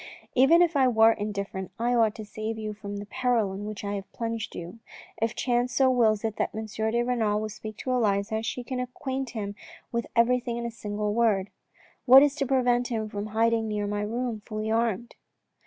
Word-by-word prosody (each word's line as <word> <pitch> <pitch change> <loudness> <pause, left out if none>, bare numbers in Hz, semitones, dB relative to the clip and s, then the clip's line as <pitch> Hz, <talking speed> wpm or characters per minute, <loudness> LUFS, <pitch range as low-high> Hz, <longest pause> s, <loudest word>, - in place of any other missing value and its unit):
" - - -25
Even 275 +7 +6
if 340 -2 0
I 265 -2 +5
were 225 -2 +6
indifferent 200 -3 -4
I 240 +2 +1
ought 225 -3 +3
to 215 - -7
save 215 +1 -5
you 215 -1 -4
from 205 -1 -7
the 205 - -6
peril 235 -4 0
in 200 +2 -6
which 210 -1 -6
I 200 0 -2
have 195 -2 -6
plunged 230 -1 -4
you. 175 +6 -8 0.4
If 225 +1 0
chance 245 0 0
so 265 -1 +4
wills 220 -4 +3
it 220 -1 -2
that - - -1
M. 220 0 -3
de 220 +2 -1
Renal 215 -3 0
should - - -9
speak 215 +1 -8
to 255 - -3
Elisa, 220 -2 +1
she 245 +2 -4
can 255 +1 -4
acquaint 260 +1 -4
him 205 -1 -3 0.4
with 235 -1 -2
everything 240 0 +2
in 235 - -3
a 235 - -3
single 210 -1 -3
word. 210 -4 +2 0.6
What 265 +3 +10
is 290 -1 +3
to 275 - 0
prevent 245 -2 +2
him 220 -3 -3
from 205 0 -4
hiding 225 +1 +1
near 210 -1 -2
my 205 0 -2
room 230 +1 -2
fully 215 +1 -4
armed 230 0 0
225 Hz, 210 wpm, -27 LUFS, 210-245 Hz, 0.6 s, What